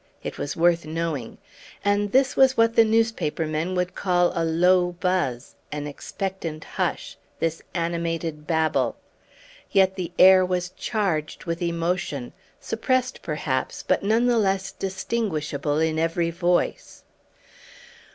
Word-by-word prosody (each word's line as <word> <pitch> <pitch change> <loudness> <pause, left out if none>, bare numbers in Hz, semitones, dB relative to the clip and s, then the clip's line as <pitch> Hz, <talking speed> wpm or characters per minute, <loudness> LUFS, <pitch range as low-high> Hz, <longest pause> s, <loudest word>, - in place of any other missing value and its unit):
It - - -6
was 145 - -3
worth 170 0 +3
knowing. 155 -6 -3 0.5
And 205 0 +1
this 265 +2 +3
was 265 -1 +5
what 230 0 +3
the 230 - +7
newspaper 225 -8 +1
men 155 +4 -2
would 180 0 -1
call 175 -2 +2
a 165 - 0
low 175 +2 +3
buzz 175 -9 -1 0.2
an 150 0 -4
expectant 165 +1 -5
hush - - -3 0.2
this 165 0 -2
animated 165 -2 -2
babble! 160 -2 +1 0.7
Yet 190 -1 +4
the 180 -3 -5
air 185 0 +8
was 180 -1 -1
charged 185 -11 -2
with 170 0 -3
emotion, 170 -6 -2 0.3
suppressed 255 -1 -1
perhaps, 145 -4 -2
but - - +1
none 220 +4 +2
the 240 -2 +3
less 195 -2 0
distinguishable 185 -7 -2
in 160 0 +1
every 165 +1 0
voice. 175 +1 -1
175 Hz, 130 wpm, -24 LUFS, 160-195 Hz, 0.7 s, air